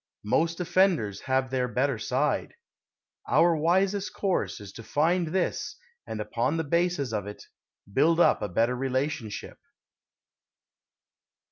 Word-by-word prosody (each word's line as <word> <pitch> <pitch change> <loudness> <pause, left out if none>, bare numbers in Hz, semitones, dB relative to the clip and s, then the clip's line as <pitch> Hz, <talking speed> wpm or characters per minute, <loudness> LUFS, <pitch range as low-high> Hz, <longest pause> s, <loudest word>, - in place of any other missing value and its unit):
Most 160 - +1
offenders 170 - +2
have 130 -1 +1
their 130 -1 0
better 130 +4 0
side. 135 +4 -1 0.7
Our 170 0 +4
wisest 190 +6 +1
course 195 -3 -1
is 100 -2 -10
to - - -9
find 165 +7 +1
this 180 +3 -2 0.3
and - - -5
upon - - -1
the 165 - 0
basis 170 -5 0
of 105 -2 -2
it 105 - -9 0.5
build 165 +7 +3
up - - +4
a 105 - -2
better 115 +7 +1
relationship. 130 -3 -3
150 Hz, 125 wpm, -27 LUFS, 125-175 Hz, 0.7 s, Our